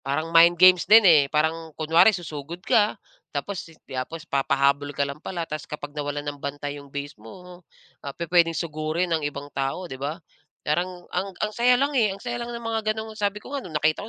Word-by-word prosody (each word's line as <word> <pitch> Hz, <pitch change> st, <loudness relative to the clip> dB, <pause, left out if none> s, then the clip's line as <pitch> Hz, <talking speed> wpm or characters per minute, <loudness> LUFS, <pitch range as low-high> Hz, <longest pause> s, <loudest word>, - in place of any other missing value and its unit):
parang 155 Hz, +5 st, -3 dB
mind 170 Hz, +1 st, +7 dB
games 185 Hz, +1 st, +6 dB
din, 220 Hz, 0 st, +8 dB
eh. 160 Hz, -5 st, +7 dB
Parang 160 Hz, +1 st, -1 dB
kunwari 165 Hz, +5 st, +5 dB
susugod 165 Hz, +1 st, -8 dB
ka, 210 Hz, 0 st, +3 dB, 0.4 s
tapos 180 Hz, +4 st, -4 dB
si 160 Hz, -, -17 dB
tapos 135 Hz, +5 st, -6 dB
papahabol 140 Hz, 0 st, +1 dB
ka 140 Hz, -, +2 dB
lang 140 Hz, +2 st, -7 dB
pala. 170 Hz, -2 st, -4 dB
Ta's 155 Hz, -2 st, -7 dB
kapag 145 Hz, -1 st, -7 dB
nawalan 145 Hz, 0 st, -4 dB
ng 145 Hz, -1 st, -6 dB
bantay 145 Hz, 0 st, -5 dB
yung 140 Hz, -, -14 dB
base 145 Hz, +1 st, -6 dB
mo, 180 Hz, -, -12 dB, 0.4 s
ah, 140 Hz, -1 st, -8 dB
pupuwedeng 170 Hz, -1 st, +2 dB
sugurin 160 Hz, +2 st, -2 dB
ng 155 Hz, -2 st, 0 dB
ibang 145 Hz, 0 st, -9 dB
tao, 135 Hz, +7 st, -2 dB
'di 130 Hz, -6 st, -8 dB
ba? 145 Hz, +4 st, -3 dB, 0.5 s
Parang 175 Hz, +3 st, -2 dB
ang 185 Hz, +1 st, -3 dB
ang 215 Hz, 0 st, -2 dB
saya 245 Hz, +3 st, +4 dB
lang, 280 Hz, +3 st, +1 dB
eh, 215 Hz, -7 st, +2 dB
ang -, -, -18 dB
saya 240 Hz, 0 st, -3 dB
lang 235 Hz, -, -5 dB
ng 235 Hz, -, -9 dB
mga 225 Hz, -1 st, -1 dB, 0.2 s
ganong 220 Hz, 0 st, -6 dB
sabi 210 Hz, -1 st, -3 dB
ko -, -, -10 dB
nga 280 Hz, -, -2 dB
no'ng 165 Hz, -9 st, -6 dB
nakita 155 Hz, +8 st, 0 dB
165 Hz, 210 wpm, -24 LUFS, 145-185 Hz, 0.5 s, din